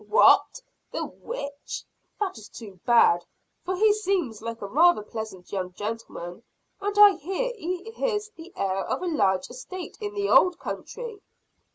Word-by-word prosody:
"What, -, -, +5 dB, 0.3 s
the -, -, -2 dB
witch! 285 Hz, -, -6 dB, 0.4 s
that 405 Hz, -3 st, -1 dB
is 215 Hz, -3 st, -11 dB
too 200 Hz, -5 st, -11 dB
bad. 200 Hz, -7 st, +5 dB, 0.4 s
For 370 Hz, +1 st, -1 dB
he 425 Hz, +2 st, +5 dB
seems 370 Hz, -, -1 dB
like 230 Hz, 0 st, -5 dB
a -, -, -2 dB
rather 305 Hz, -, +4 dB
pleasant 210 Hz, -4 st, -7 dB
young 185 Hz, -2 st, -3 dB
gentleman; 205 Hz, -3 st, -6 dB, 0.4 s
and 410 Hz, +1 st, -2 dB
I 410 Hz, -2 st, +9 dB
hear 385 Hz, -, -2 dB
he 365 Hz, -2 st, -4 dB, 0.2 s
is 430 Hz, -3 st, 0 dB
the 335 Hz, +3 st, -11 dB
heir 195 Hz, 0 st, -1 dB
of -, -, -2 dB
a -, -, -1 dB
large 190 Hz, -, +1 dB
estate 355 Hz, +9 st, -8 dB
in 415 Hz, 0 st, -4 dB
the 405 Hz, 0 st, 0 dB
old 360 Hz, -3 st, +5 dB
country." 455 Hz, +2 st, -6 dB
335 Hz, 160 wpm, -26 LUFS, -, 0.4 s, I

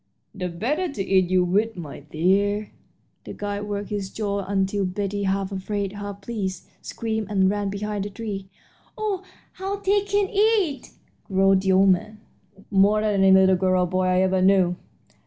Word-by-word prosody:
"The 180 Hz, -2 st, -4 dB
better 280 Hz, -, -2 dB
to 205 Hz, -8 st, -3 dB
eat 190 Hz, -2 st, +3 dB
you 185 Hz, -1 st, +3 dB
with, 205 Hz, +4 st, 0 dB
my 155 Hz, -5 st, -7 dB
dear." 195 Hz, +8 st, 0 dB, 0.5 s
The -, -, -8 dB
guide 205 Hz, 0 st, -4 dB
worked 205 Hz, 0 st, -4 dB
his 200 Hz, -2 st, -3 dB
jaws 200 Hz, -1 st, -3 dB
until 195 Hz, 0 st, 0 dB
Betty, 200 Hz, +2 st, -2 dB
half 195 Hz, 0 st, -1 dB
afraid 195 Hz, 0 st, -3 dB
and 205 Hz, 0 st, -9 dB
half 200 Hz, 0 st, -7 dB
pleased, 195 Hz, -3 st, -4 dB
screamed 220 Hz, -2 st, -3 dB
and 190 Hz, -2 st, +3 dB
ran 205 Hz, -1 st, -2 dB
behind 205 Hz, 0 st, -3 dB
a -, -, -7 dB
tree. 200 Hz, -2 st, -6 dB, 0.5 s
"Oh, 420 Hz, -3 st, -2 dB, 0.3 s
how 390 Hz, +1 st, -4 dB
they 405 Hz, 0 st, +1 dB
can 405 Hz, 0 st, 0 dB
eat!" 410 Hz, -8 st, +1 dB, 0.4 s
growled 195 Hz, -1 st, +3 dB
the 190 Hz, 0 st, +2 dB
old 195 Hz, +1 st, +5 dB
man, 210 Hz, +4 st, 0 dB, 0.5 s
"more 205 Hz, +2 st, +4 dB
than 210 Hz, -2 st, +1 dB
any 190 Hz, -, +6 dB
little 190 Hz, 0 st, +6 dB
girl 185 Hz, 0 st, +2 dB
or -, -, +2 dB
boy 185 Hz, +1 st, 0 dB
I 185 Hz, 0 st, +3 dB
ever 190 Hz, 0 st, +2 dB
knew! 185 Hz, -2 st, +4 dB
200 Hz, 175 wpm, -24 LUFS, 190-215 Hz, 0.5 s, any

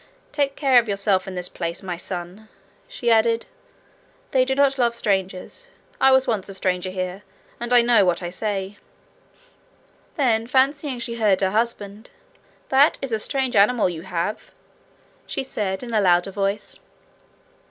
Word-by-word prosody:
'Take 280 Hz, -2 st, -1 dB
care 265 Hz, -4 st, +5 dB
of 235 Hz, -2 st, -3 dB
yourself 200 Hz, -1 st, +1 dB
in 190 Hz, -, -6 dB
this 180 Hz, 0 st, +1 dB
place, 170 Hz, 0 st, -5 dB
MY 180 Hz, -2 st, -4 dB
son,' 180 Hz, +4 st, -7 dB, 0.4 s
she 245 Hz, -, -1 dB
added. 230 Hz, +1 st, +3 dB, 0.9 s
'They 260 Hz, -1 st, +3 dB
do 265 Hz, 0 st, -1 dB
not 275 Hz, -1 st, +2 dB
love 235 Hz, -1 st, +2 dB
strangers. 190 Hz, -, -3 dB, 0.3 s
I 265 Hz, -, +5 dB
was 265 Hz, 0 st, +5 dB
once 215 Hz, -7 st, -2 dB
a 195 Hz, -, -8 dB
stranger 185 Hz, -1 st, -1 dB
here, 185 Hz, +1 st, -4 dB, 0.4 s
and 240 Hz, +1 st, -5 dB
I 245 Hz, -1 st, +6 dB
know 235 Hz, -3 st, +4 dB
what 180 Hz, -1 st, 0 dB
I 175 Hz, -, -4 dB
say.' 200 Hz, 0 st, -4 dB, 1.4 s
Then 230 Hz, -7 st, +1 dB
fancying 270 Hz, +1 st, +1 dB
she 235 Hz, -1 st, -4 dB
heard 205 Hz, -4 st, +2 dB
her 190 Hz, -1 st, +1 dB
husband, 215 Hz, -1 st, -2 dB, 0.6 s
'That 275 Hz, +3 st, +4 dB
is 270 Hz, -, -3 dB
a 220 Hz, -, 0 dB
strange 260 Hz, +2 st, -1 dB
animal 210 Hz, +1 st, +4 dB
you 165 Hz, -2 st, -6 dB
have,' 180 Hz, +3 st, -4 dB, 0.8 s
she -, -, -3 dB
said, 195 Hz, -6 st, -3 dB
in 235 Hz, -2 st, -7 dB
a 215 Hz, -, +3 dB
louder 180 Hz, 0 st, +3 dB
voice. 200 Hz, +1 st, -3 dB
215 Hz, 160 wpm, -22 LUFS, 190-245 Hz, 1.4 s, I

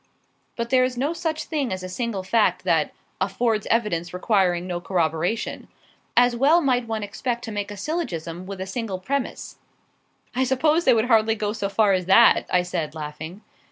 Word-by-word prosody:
But 235 Hz, 0 st, -4 dB
there 255 Hz, -1 st, +5 dB
is 255 Hz, -1 st, -1 dB
no 285 Hz, +6 st, 0 dB
such 320 Hz, -2 st, -2 dB
thing 285 Hz, -, -2 dB
as 185 Hz, 0 st, -4 dB
a -, -, -4 dB
single 200 Hz, 0 st, -3 dB
fact 220 Hz, +3 st, +2 dB
that -, -, +2 dB, 0.3 s
'affords 225 Hz, -3 st, 0 dB
evidence 180 Hz, -7 st, 0 dB
requiring 180 Hz, -3 st, +1 dB
no 175 Hz, -1 st, -4 dB
corroboration.' 175 Hz, +3 st, -1 dB, 0.5 s
As 245 Hz, 0 st, +5 dB
well 285 Hz, +8 st, +5 dB
might 250 Hz, -6 st, +1 dB
one 220 Hz, -1 st, -3 dB
expect 235 Hz, +4 st, -3 dB
to 225 Hz, -, -5 dB
make 205 Hz, -1 st, -3 dB
a 205 Hz, -, -8 dB
syllogism 185 Hz, -, -4 dB
with 195 Hz, -1 st, -7 dB
a 190 Hz, -, -3 dB
single 200 Hz, -1 st, -4 dB
premise." 265 Hz, +8 st, -4 dB, 0.8 s
"I 260 Hz, -, +2 dB
suppose 300 Hz, +6 st, +2 dB
they 255 Hz, -, +6 dB
would 220 Hz, 0 st, +2 dB
hardly 225 Hz, -2 st, +3 dB
go 210 Hz, -1 st, -2 dB
so 200 Hz, -3 st, -3 dB
far 205 Hz, -1 st, +3 dB
as 180 Hz, -2 st, -1 dB
that," 230 Hz, +5 st, +6 dB
I 180 Hz, -1 st, +3 dB
said, 165 Hz, -4 st, -3 dB
laughing. 160 Hz, +5 st, -7 dB
215 Hz, 185 wpm, -24 LUFS, 185-245 Hz, 0.8 s, they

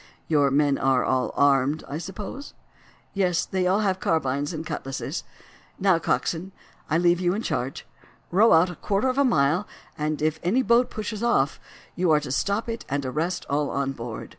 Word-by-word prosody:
Your 145 Hz, -3 st, +3 dB
men 140 Hz, 0 st, +2 dB
are 130 Hz, -1 st, +2 dB
all 130 Hz, -1 st, 0 dB
armed, 140 Hz, +1 st, +3 dB
I 145 Hz, +3 st, -4 dB
suppose?" 200 Hz, -, -7 dB, 0.6 s
"Yes; 185 Hz, -4 st, +1 dB
they 185 Hz, -1 st, -1 dB
have 195 Hz, +4 st, +2 dB
all 190 Hz, -, +3 dB
carbines 145 Hz, -5 st, -1 dB
and 160 Hz, -1 st, -5 dB
cutlasses. 135 Hz, -3 st, -4 dB, 0.5 s
Now, 185 Hz, -3 st, +3 dB
coxswain, 175 Hz, +3 st, -1 dB, 0.4 s
I 155 Hz, -, +2 dB
leave 175 Hz, 0 st, +3 dB
you 180 Hz, +1 st, +1 dB
in 220 Hz, -, -3 dB
charge. 130 Hz, +3 st, -3 dB, 0.5 s
Row 210 Hz, +6 st, +5 dB
out 165 Hz, +3 st, +5 dB
a -, -, -9 dB
quarter 205 Hz, +9 st, 0 dB
of 255 Hz, +2 st, 0 dB
a -, -, +5 dB
mile, 175 Hz, -, +2 dB, 0.3 s
and 150 Hz, 0 st, -2 dB
if 155 Hz, +1 st, 0 dB
any 225 Hz, +10 st, +2 dB
boat 235 Hz, +1 st, +3 dB
pushes 215 Hz, 0 st, -5 dB
off 235 Hz, -, +1 dB, 0.4 s
you 180 Hz, -1 st, +1 dB
are 155 Hz, -1 st, +5 dB
to 145 Hz, -3 st, -6 dB
stop 200 Hz, -, 0 dB
it 230 Hz, 0 st, -4 dB
and 140 Hz, 0 st, -1 dB
arrest 160 Hz, +7 st, -2 dB
all 145 Hz, 0 st, 0 dB
on 140 Hz, -1 st, -1 dB
board. 115 Hz, -3 st, -7 dB
165 Hz, 185 wpm, -25 LUFS, 140-195 Hz, 0.6 s, Row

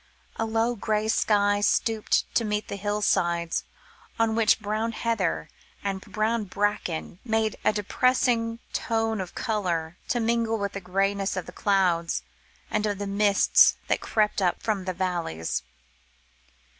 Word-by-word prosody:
A 225 Hz, -, 0 dB
low 225 Hz, +2 st, +1 dB
grey 215 Hz, 0 st, -1 dB
sky 205 Hz, -2 st, +2 dB
stooped 220 Hz, +1 st, +2 dB
to 235 Hz, -, +2 dB
meet 210 Hz, -1 st, -2 dB
the -, -, -3 dB
hill 205 Hz, +1 st, -2 dB
sides, 170 Hz, -3 st, +1 dB, 0.5 s
on 225 Hz, -1 st, +2 dB
which 225 Hz, -1 st, +3 dB
brown 215 Hz, +2 st, -2 dB
heather 225 Hz, -6 st, -1 dB, 0.4 s
and 195 Hz, -1 st, -2 dB
brown 215 Hz, +2 st, -1 dB
bracken 195 Hz, -4 st, -2 dB
made 220 Hz, -2 st, 0 dB
a -, -, +4 dB
depressing 230 Hz, +2 st, +1 dB, 0.2 s
tone 225 Hz, -2 st, 0 dB
of 180 Hz, -, -7 dB
colour, 175 Hz, -7 st, -2 dB
to 240 Hz, -, 0 dB
mingle 230 Hz, 0 st, +1 dB
with 200 Hz, -1 st, -2 dB
the 195 Hz, -, -6 dB
greyness 195 Hz, +1 st, 0 dB
of 185 Hz, -, -3 dB
the -, -, -9 dB
clouds, 180 Hz, -5 st, +1 dB, 0.5 s
and 215 Hz, 0 st, +1 dB
of 205 Hz, -1 st, -1 dB
the 205 Hz, -, -4 dB
mists 200 Hz, 0 st, +5 dB
that -, -, +1 dB
crept 210 Hz, -2 st, +1 dB
up 180 Hz, -2 st, +1 dB
from 205 Hz, -4 st, -1 dB
the 185 Hz, -, -2 dB
valleys. 170 Hz, -, -2 dB
210 Hz, 145 wpm, -26 LUFS, 190-225 Hz, 0.5 s, mists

